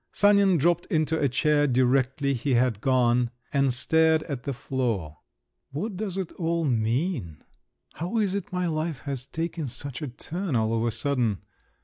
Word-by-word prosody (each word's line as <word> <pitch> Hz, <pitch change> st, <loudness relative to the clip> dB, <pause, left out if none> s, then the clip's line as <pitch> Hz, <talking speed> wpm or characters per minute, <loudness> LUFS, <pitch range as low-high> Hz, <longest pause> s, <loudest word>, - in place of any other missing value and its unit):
Sanin 200 Hz, -3 st, +4 dB
dropped 170 Hz, +3 st, +2 dB
into 160 Hz, 0 st, +1 dB
a 140 Hz, -, +2 dB
chair 145 Hz, +3 st, +2 dB
directly 130 Hz, +2 st, +2 dB
he 130 Hz, +1 st, 0 dB
had 120 Hz, -3 st, +1 dB
gone, 125 Hz, -2 st, +3 dB, 0.2 s
and 140 Hz, -2 st, +3 dB
stared 160 Hz, +5 st, +3 dB
at 140 Hz, -6 st, -6 dB
the 140 Hz, -, -1 dB
floor. 120 Hz, -, -3 dB, 0.5 s
"What 185 Hz, +10 st, -4 dB
does 195 Hz, -1 st, -3 dB
it 190 Hz, -3 st, -3 dB
all 170 Hz, -1 st, 0 dB
mean? 115 Hz, -, -1 dB, 0.5 s
How 180 Hz, +8 st, -3 dB
is 205 Hz, -4 st, +1 dB
it 200 Hz, -1 st, -4 dB
my 180 Hz, 0 st, -1 dB
life 155 Hz, -4 st, -2 dB
has 130 Hz, 0 st, -5 dB
taken 165 Hz, 0 st, -3 dB
such 135 Hz, +3 st, -6 dB
a 150 Hz, -, -3 dB
turn 165 Hz, +6 st, -4 dB
all 110 Hz, 0 st, +1 dB
of 115 Hz, -, 0 dB
a -, -, +2 dB
sudden? 115 Hz, -3 st, -1 dB
140 Hz, 165 wpm, -26 LUFS, 125-170 Hz, 0.5 s, Sanin